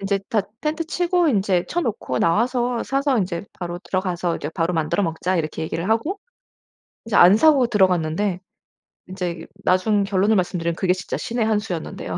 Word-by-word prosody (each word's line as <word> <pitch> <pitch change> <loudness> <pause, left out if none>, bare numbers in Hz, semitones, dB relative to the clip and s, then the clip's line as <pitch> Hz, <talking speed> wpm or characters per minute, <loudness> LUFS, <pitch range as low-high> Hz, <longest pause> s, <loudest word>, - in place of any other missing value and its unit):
인제 195 0 0
다 220 - +2 0.2
텐트 310 +2 -2
치고 350 +1 +1
인제 195 -7 +1
쳐 345 - -1
놓고 215 - -2
나와서 240 +6 +1
사서 275 0 0
인제 180 -1 -2
바로 175 -1 -5
들어가서 180 -2 -2
이제 145 - -5
바로 165 +1 -1
만들어 160 +5 0
먹자." 170 +3 -1
이렇게 155 -1 -3
얘기를 165 +3 -3
하고 300 - 0 0.9
인제 230 - -2
안 180 +4 +8
사고 285 -2 +5
들어갔는데 185 -2 +1 0.7
인제 180 -3 -5 0.2
나중 200 +3 +2
결론을 200 +2 +2
말씀드리면 175 -2 -1
그게 185 +1 +1
진짜 185 - -5
신의 235 -1 -2
한 215 -1 +2
수였는데요. 180 -7 -5
190 Hz, 375 characters per minute, -22 LUFS, 175-230 Hz, 0.9 s, 안